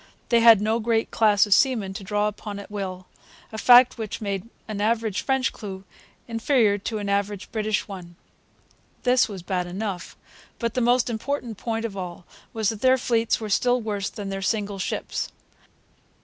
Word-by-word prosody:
They 235 - +5
had 230 -3 +7
no 220 +2 +1
great 225 0 0
class 210 -2 +4
of 205 - +4
seamen 220 -6 +2
to 195 - -7
draw 210 +2 0
upon 210 0 -6
at 200 +1 -10
will, 185 -3 -5 0.5
a 220 - -6
fact 245 +1 +7
which 220 -2 -4
made 200 0 -4 0.2
an 210 -2 -4
average 220 -2 0
French 265 -1 0
crew 195 -3 -8 0.4
inferior 225 -3 +2
to 215 +3 -3
an 205 -1 -4
average 200 -1 -2
British 215 -1 -1
one. 180 -4 -9 0.9
This 250 -2 +3
was 190 -4 -7
bad 180 -1 -2
enough. 190 0 -5 0.4
But 235 -2 -2
the 255 - 0
most 245 +1 +3
important 235 -1 -3
point 225 -1 -2
of 210 -4 -5
all 180 -2 -6 0.3
was 220 -3 0
that 220 -2 -5
their 260 0 +5
fleets 230 -2 +1
were 220 - -5
still 245 +4 +3
worse 205 -4 -3
than 205 -3 -6
their 195 0 -4
single 205 0 -1
ships. - - -3
215 Hz, 175 wpm, -24 LUFS, 200-230 Hz, 0.9 s, had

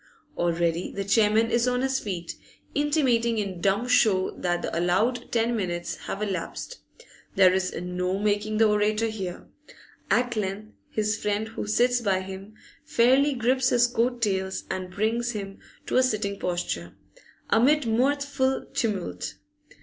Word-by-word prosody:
Already 170 0 0
the 200 - -3
chairman 215 +2 +3
is 235 +1 +2
on 250 0 +1
his 265 0 0
feet, 175 -5 -5 0.4
intimating 260 -6 +2
in 195 -4 -3
dumb 200 +6 +1
show 215 -6 +3
that 175 -1 -2
the - - -3
allowed 215 +9 0
ten 235 0 +1
minutes 175 -4 -3
have 205 - -3
elapsed; 195 - -4 0.6
there 185 -2 +6
is 185 0 0
no 180 +1 -2
making 210 +1 0
the 220 0 +5
orator 210 +1 +2
hear. 195 -5 -5 0.6
At 245 -1 +2
length 210 +1 -4 0.2
his 215 0 -1
friend 210 +1 -1
who 225 - -5
sits 245 +3 +2
by 195 -4 +1
him 195 +3 -9 0.3
fairly 275 -1 +3
grips 255 +2 +2
his 245 0 +4
coat 240 0 0
tails 190 -2 -1
and 185 -1 -4
brings 230 +5 -1
him 195 -2 -6 0.3
to - - 0
a - - +6
sitting 210 -5 -1
posture, 90 - -3 0.6
amid 280 +5 +4
mirthful 265 +3 +1
tumult. 185 - -2
215 Hz, 145 wpm, -26 LUFS, 190-240 Hz, 0.6 s, there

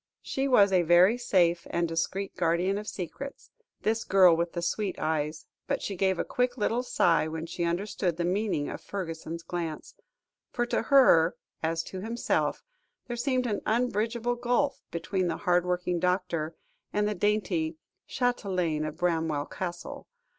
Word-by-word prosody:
She 270 +1 -1
was 205 -7 +5
a 185 - +5
very 175 +6 +5
safe 180 -8 +2
and 170 0 0
discreet 175 +4 -2
guardian 180 +3 +1
of 210 - -8
secrets, 270 +11 -7 0.3
this 220 +1 +1
girl 185 -3 +6
with 170 +1 -1
the 170 - -3
sweet 190 +3 -1
eyes, 155 0 -2 0.2
but - - -1
she 200 - -3
gave 190 0 +1
a - - -1
quick 250 0 0
little 230 +2 +1
sigh 170 -10 +2
when 160 +1 -4
she 170 +1 -3
understood 175 0 -1
the 170 - 0
meaning 185 -5 0
of - - -6
Fergusson's 165 -3 -5
glance, 170 -2 -5 0.6
for 240 - -1
to - - 0
her, 210 - +5 0.3
as 165 0 0
to 190 - -7
himself, 230 +3 -1 0.4
there 240 - -4
seemed 255 +1 0
an 215 -4 -1
unbridgeable 235 +1 0
gulf, 245 +4 0
between 185 +2 -1
the 165 - -2
hard 180 -2 +2
working 180 -1 0
doctor, 180 -3 -1 0.4
and 210 0 +1
the 210 - 0
dainty 180 -5 0 0.3
châtelaine 185 -11 0
of - - -7
Bramwell 160 -4 0
Castle. 175 0 -6
180 Hz, 160 wpm, -28 LUFS, 170-215 Hz, 0.6 s, girl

